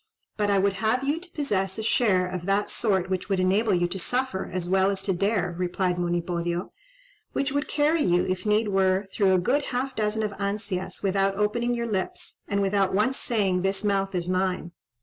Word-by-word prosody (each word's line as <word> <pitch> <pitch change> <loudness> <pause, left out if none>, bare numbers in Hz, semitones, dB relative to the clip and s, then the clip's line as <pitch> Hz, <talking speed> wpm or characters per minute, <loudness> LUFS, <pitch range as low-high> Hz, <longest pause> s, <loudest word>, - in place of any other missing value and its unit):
"But 205 -1 0
I 200 - +3
would 195 +1 +2
have 230 +4 +1
you 290 +4 0
to 355 +1 -11
possess 195 - -1
a 220 - -3
share 205 -5 +3
of 180 0 -5
that 200 +1 +1
sort 190 -5 +1
which 185 +1 -3
would 195 -2 +1
enable 200 +4 +2
you 175 0 +1
to 190 - -4
suffer 245 -1 -1
as 180 -1 -3
well 190 +1 +3
as 195 -1 -2
to 195 - 0
dare," 190 -1 0
replied 180 0 -1
Monipodio, 175 0 -2 0.6
"which 275 0 0
would 285 +1 -1
carry 300 +2 +2
you, 175 -7 +2
if 185 0 -2
need 210 0 +2
were, 190 0 +2
through 195 -3 +3
a - - +4
good 265 +11 +1
half 260 +1 -3
dozen 215 0 0
of 210 - -1
ansias 200 -2 -3
without 195 0 +1
opening 235 +4 0
your 235 0 -2
lips, 200 -5 -3
and 200 0 0
without 195 -1 +1
once 255 +6 +2
saying 195 -6 +1
'This 195 +2 0
mouth 195 -2 0
is 175 -1 -1
mine.'" 185 -1 -1
195 Hz, 205 wpm, -26 LUFS, 185-220 Hz, 0.6 s, a